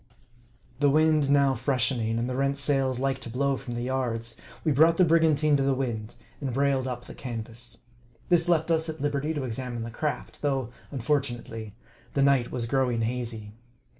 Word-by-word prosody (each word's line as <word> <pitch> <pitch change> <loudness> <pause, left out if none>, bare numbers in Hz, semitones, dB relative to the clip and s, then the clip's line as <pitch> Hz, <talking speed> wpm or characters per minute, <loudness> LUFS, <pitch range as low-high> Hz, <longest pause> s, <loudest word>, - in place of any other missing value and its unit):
The 145 -1 +4
wind 155 -1 +3
now 140 -1 +4
freshening, 120 -3 0
and 120 +1 -1
the 125 - -3
rent 140 +1 +1
sails 135 -2 +1
like 135 +1 0
to 120 - -7
blow 135 +3 +1
from 120 -2 -6
the 120 - -3
yards, 120 -3 -2 0.3
we 155 - +2
brought 160 +4 +5
the 185 - +6
brigantine 155 -2 +4
to - - 0
the 135 0 +2
wind, 115 -5 -3 0.2
and 135 -3 -3
br 135 +4 +1
ailed 135 -2 +1
up 120 -1 -5
the - - -10
canvas. 115 -1 -6 0.4
This 175 -1 +3
left 165 -1 +2
us 160 0 +1
at 160 0 -5
liberty 145 +1 -1
to 145 - -2
examine 120 -1 -4
the 115 - -6
craft, 150 +5 -4
though, 135 -5 0 0.2
unfortunately, 120 -5 -2 0.4
the 140 - +3
night 135 -3 +3
was 120 -2 -1
growing 125 -2 +1
hazy. 115 -3 -3
135 Hz, 185 wpm, -27 LUFS, 120-145 Hz, 0.4 s, the